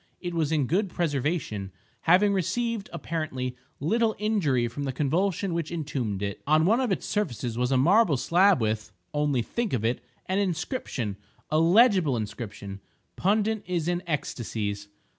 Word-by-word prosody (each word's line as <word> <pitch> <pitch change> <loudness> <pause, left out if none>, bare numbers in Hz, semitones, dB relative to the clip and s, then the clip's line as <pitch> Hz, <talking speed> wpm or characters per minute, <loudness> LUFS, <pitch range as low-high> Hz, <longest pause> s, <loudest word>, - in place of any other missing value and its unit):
It 175 -1 -4
was 160 -2 0
in 150 -4 +2
good 190 - +1
preservation, 145 - -2 0.3
having 190 +4 +4
received, 225 +3 -1
apparently, 155 -7 -3 0.2
little 220 - +1
injury 165 - +1
from 140 +5 -5
the 135 - -1
convulsion 170 +7 0
which 165 -2 -2
entombed 130 - -3
it. 100 -1 -4
On 155 +2 +4
one 225 +7 +4
of 255 -5 0
its 190 - -1
surfaces 125 - -2
was 125 +2 0
a 130 - +4
marble 170 - +4
slab 175 +7 +4
with 110 -1 -1 0.2
(only 145 -4 +1
think 235 - -2
of 115 -3 0
it!) 120 +2 0 0.2
an 190 +2 0
inscription—a 155 - -3
legible 180 - +5
inscription. 100 -2 -6 0.3
Pundit 215 +3 +1
is 175 -3 -1
in 175 0 0
ecstacies. 105 -9 -3
155 Hz, 150 wpm, -27 LUFS, 125-195 Hz, 0.3 s, legible